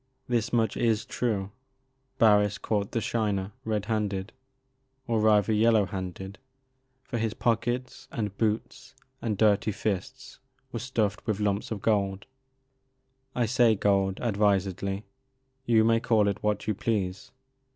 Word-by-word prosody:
This 120 -1 0
much 115 -3 +1
is 115 -2 +1
true: 105 -5 -2 0.7
Barris 105 -2 +4
caught 100 -2 -1
the 115 - -1
Shiner, 105 -4 -1
red 105 -2 -1
handed, 105 -3 -2 0.7
or 115 -2 0
rather 105 -1 +4
yellow 110 -1 +4
handed, 95 +1 -6 0.6
for 120 -4 -4
his 110 -1 -1
pockets 120 +2 -1
and 105 -4 -3
boots 115 +5 -2 0.3
and 110 -3 -1
dirty 105 0 +3
fists 110 +6 -4 0.3
were 115 - -4
stuffed 110 -4 -2
with 105 -2 0
lumps 105 0 0
of 110 -3 -5
gold. 100 -3 +1 1.1
I 120 - +2
say 115 -1 +4
gold, 95 -1 +1
advisedly. 100 -2 0 0.6
You 115 -2 +5
may 115 0 +4
call 110 -3 +2
it 100 - -1
what 105 0 -1
you 110 - +1
please. 100 +1 -2
105 Hz, 130 wpm, -27 LUFS, 100-115 Hz, 1.1 s, You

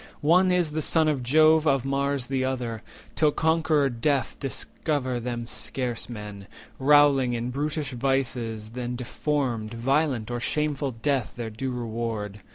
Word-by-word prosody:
One 180 +4 +5
is 175 -4 +1
the 155 +1 -2
son 160 +1 +3
of 145 -4 0
Jove, 155 +5 +4
of 135 -3 +2
Mars 140 -1 0
the 130 0 -1
other; 120 -4 -3 0.3
Till 155 - +4
conqueror 160 -2 +2
Death 125 0 0
discover 135 -1 -2
them 120 0 -4
scarce 115 +3 -2
men, 105 -3 -8 0.3
Rowling 140 -2 +5
in 120 +1 -2
brutish 145 +1 -2
vices, 120 -4 -2
and 125 -1 -3
deformed, 125 -3 -2
Violent 130 -1 0
or 120 - -2
shameful 150 +1 -1
death 130 +2 -1
their 115 -2 -5
due 130 +5 -4
reward. 115 -4 -4
130 Hz, 145 wpm, -26 LUFS, 120-145 Hz, 0.3 s, One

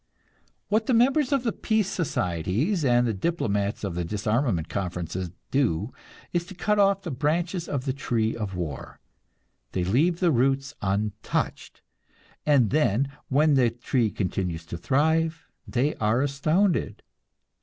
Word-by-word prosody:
What 220 +2 +1
the 255 - +3
members 265 +4 +3
of 275 -3 +2
the 230 - +1
peace 220 -3 0
societies 125 - -1
and 120 -2 +4
the 115 - 0
diplomats 105 - -1
of 100 -3 -2
the 90 +1 -2
disarmament 105 - 0
conferences 90 -2 -3 0.2
do 120 - +1 0.4
is 175 -1 +1
to 190 - -10
cut 210 +3 +1
off 195 -1 +3
the 170 - -4
branches 165 +6 -1
of 140 -2 -2
the 130 - 0
tree 115 -5 -1
of 105 -4 -4
war. 80 -6 -5 0.7
They 90 - 0
leave 150 - +2
the 175 -3 +3
roots 135 +2 +1
untouched, 105 +2 -2 0.6
and 135 -7 +4
then, 140 -3 +2 0.2
when 150 +3 +4
the 130 -4 +4
tree 120 0 0
continues 90 -4 -3
to 85 +1 -6
thrive, 160 +4 +1 0.2
they 130 +4 +1
are 110 +4 +2
astounded. 155 +7 +1
130 Hz, 145 wpm, -26 LUFS, 100-165 Hz, 0.7 s, and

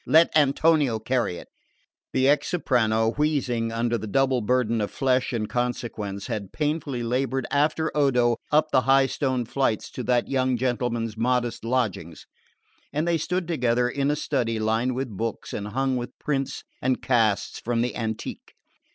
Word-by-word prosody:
Let 160 +1 +5
Antonio 145 -3 +3
carry 115 -5 -1
it." - - -10 0.6
The 130 0 +2
ex 145 0 +3
soprano, 115 -9 +1
wheezing 130 -6 0
under 115 0 0
the 110 - -6
double 130 +3 +2
burden 115 0 +1
of 105 - -1
flesh 130 -1 +1
and 110 -3 -2
consequence, 115 -5 -3
had 105 -6 -4
painfully 150 -5 -2
laboured 130 +2 -1
after 155 +2 +1
Odo 125 -5 +3
up 155 +1 +3
the 130 - +4
high 135 +1 +4
stone 130 -3 -1
flights 115 -3 -1
to - - -5
that 120 0 +2
young 130 -2 +1
gentleman's 120 -2 -1
modest 120 0 0
lodgings, 110 - -2 0.7
and 150 +3 -1
they 170 -1 +2
stood 180 +2 -2
together 125 -6 +1
in 140 +3 -1
a 150 - +2
study 125 -6 -1
lined 110 +3 0
with 135 +1 -2
books 115 +3 -4
and 105 - -4
hung 130 +3 0
with 120 0 -6
prints 135 -2 -2 0.2
and 130 0 0
casts 115 -5 +1
from 120 0 0
the 125 - -2
antique. 110 -2 -5
125 Hz, 160 wpm, -25 LUFS, 115-135 Hz, 0.7 s, Let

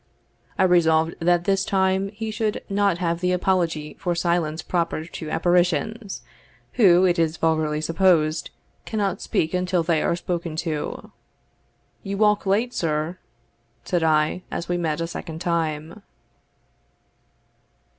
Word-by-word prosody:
I - - +3
resolved 165 -3 +3
that 175 0 +2
this 195 0 +1
time 190 0 +1
he 220 +2 -5
should 215 0 -2
not 200 -3 +1
have 170 -1 -1
the 180 0 0
apology 170 -5 0
for 175 -1 -1
silence 170 -2 0
proper 170 -3 -1
to 160 -2 -7
apparitions, 180 +5 0 0.5
who, 185 -6 +5
it 175 -1 +2
is 160 0 +1
vulgarly 155 -2 +1
supposed, 165 -1 +2 0.3
cannot 205 -4 -2
speak 160 +2 -1
until 180 -1 +1
they 160 -2 +1
are - - +1
spoken 170 -2 -4
to. 155 -3 -4 0.9
"You 195 0 -4
walk 210 -1 +2
late, 225 +6 +1
sir," 155 +2 -2 0.7
said 175 -2 0
I, 155 +2 +2
as 170 - -4
we 175 - 0
met 165 -2 -1
a - - 0
second 165 -1 -6
time. 165 +1 -2
175 Hz, 135 wpm, -23 LUFS, 160-190 Hz, 0.9 s, who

